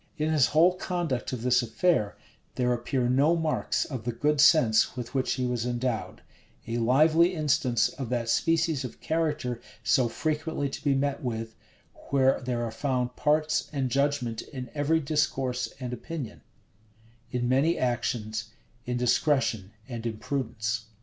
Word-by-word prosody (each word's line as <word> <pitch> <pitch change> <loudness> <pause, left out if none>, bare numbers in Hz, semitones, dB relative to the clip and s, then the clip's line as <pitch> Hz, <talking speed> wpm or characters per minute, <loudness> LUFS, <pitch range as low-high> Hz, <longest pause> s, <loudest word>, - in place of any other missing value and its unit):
In 155 +1 0
his 145 -5 +4
whole 170 +4 +4
conduct 175 -9 -2
of 125 -3 -4
this 125 0 +4
affair, 120 - +1 0.4
there 125 -1 +1
appear 120 +1 -1
no 140 +7 +3
marks 160 -2 0
of 130 -6 -6
the 120 - -1
good 145 +5 +1
sense 130 -7 +5
with 120 -1 -6
which 130 -2 +1
he 130 -1 -2
was 125 -2 -1
endowed: 120 -1 -3 0.4
a 115 +1 -2
lively 155 +9 +4
instance 130 -7 +2
of 130 -5 -6
that 120 -2 -1
species 160 +3 +1
of 125 - -7
character 150 -7 -1 0.2
so 120 +4 +3
frequently 155 +2 -2
to - - -7
be 140 -2 +2
met 140 +1 -1
with; 115 -3 -4 0.6
where 135 -1 +3
there 125 -2 -2
are 115 - -4
found 125 +1 -1
parts 155 +1 +1
and 135 -4 -2
judgment 135 -5 0
in 125 -4 -8
every 155 +2 +2
discourse 135 -4 -1
and 125 -2 -4
opinion; 135 -1 -6 0.9
in 120 -1 -1
many 140 +7 +2
actions, 115 -3 -2 0.4
indiscretion 125 -4 +1 0.2
and 120 -2 -5
imprudence. 110 -2 -3
130 Hz, 150 wpm, -27 LUFS, 120-150 Hz, 0.9 s, sense